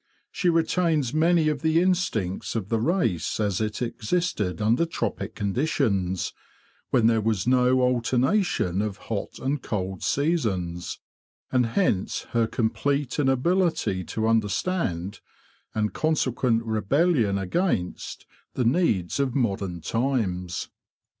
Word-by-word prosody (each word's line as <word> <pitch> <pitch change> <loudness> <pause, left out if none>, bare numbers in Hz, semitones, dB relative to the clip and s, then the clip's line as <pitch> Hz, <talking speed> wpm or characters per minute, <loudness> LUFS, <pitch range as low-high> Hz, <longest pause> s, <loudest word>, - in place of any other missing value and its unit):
She 180 - +1
retains 165 -5 +1
many 160 0 +3
of 150 -3 0
the 160 +1 +3
instincts 170 - 0
of 105 -4 -3
the 115 - +1
race 115 - 0
as 105 -2 0
it 110 +2 -2
existed 115 - -1
under 110 +8 +3
tropic 165 - -3
conditions, 100 - 0 0.6
when 120 -3 +3
there 115 -1 +4
was 105 -4 0
no 125 +1 +4
alternation 125 - +1
of 105 -2 -3
hot 100 -3 -3
and 135 +1 -2
cold 95 -3 -3
seasons; 100 - -1 0.5
and 125 -2 +3
hence 115 - 0
her 115 -1 +2
complete 135 +5 -1
inability 145 - +1
to 110 +5 -2
understand, 105 - 0 0.6
and 105 -1 0
consequent 130 -6 +1
rebellion 110 - +2
against 95 - -2 0.3
the 125 - 0
needs 115 - +1
of 135 -3 0
modern 100 -8 -1
times. 100 - -1
115 Hz, 115 wpm, -25 LUFS, 100-155 Hz, 0.6 s, there